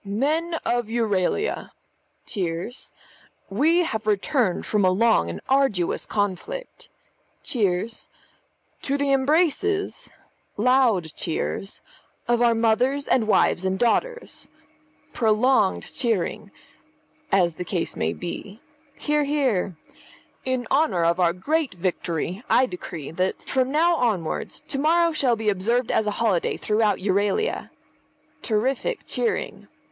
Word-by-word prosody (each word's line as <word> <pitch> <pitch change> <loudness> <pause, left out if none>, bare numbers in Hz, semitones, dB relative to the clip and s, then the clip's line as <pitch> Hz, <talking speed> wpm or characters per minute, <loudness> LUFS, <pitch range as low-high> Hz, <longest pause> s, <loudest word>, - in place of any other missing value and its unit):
"Men 300 +12 0
of 240 -2 0
Euralia 225 - 0 0.6
(cheers). 180 +4 -4 0.6
We 315 - +3
have 220 -8 -3
returned 215 0 +1
from 210 -2 +1
a 185 - +5
long 225 +5 +3
and - - -5
arduous 265 -10 +1
conflict 215 - -3 0.5
(cheers) 215 -1 -1 0.7
to 280 +1 0
the 285 -1 0
embraces 330 +8 +1 0.5
(loud 225 - +3
cheers) 180 +4 -3 0.5
of 240 0 +2
our 235 -1 +4
mothers 245 +5 +1
and 230 -4 +2
wives 195 -3 +3
and 190 0 0
daughters 475 - -1 0.7
(prolonged 220 -1 +2
cheering) 225 -9 -1 0.8
as 175 -4 +2
the 180 - -3
case 175 -1 -3
may 80 - 0
be 195 - -7 0.4
(hear, 300 0 +1
hear). 260 - 0 0.7
In 255 -1 -1
honour 270 - +2
of 170 +2 +2
our 175 -2 +4
great 280 - -1
victory 180 +2 -2
I 260 - +5
decree 175 - -7
that, 185 +3 -2
from 260 -1 0
now 335 +3 +3
onwards, 205 - -1
to 275 - -4
morrow 335 +3 +3
shall 265 -6 +2
be 220 -1 0
observed 225 +6 0
as 215 - +1
a 205 - -2
holiday 210 -7 +1
throughout 215 0 +1
Euralia 205 - 0 0.7
(terrific 260 - -1
cheering). 460 -2 -2
225 Hz, 120 wpm, -24 LUFS, 190-275 Hz, 0.8 s, a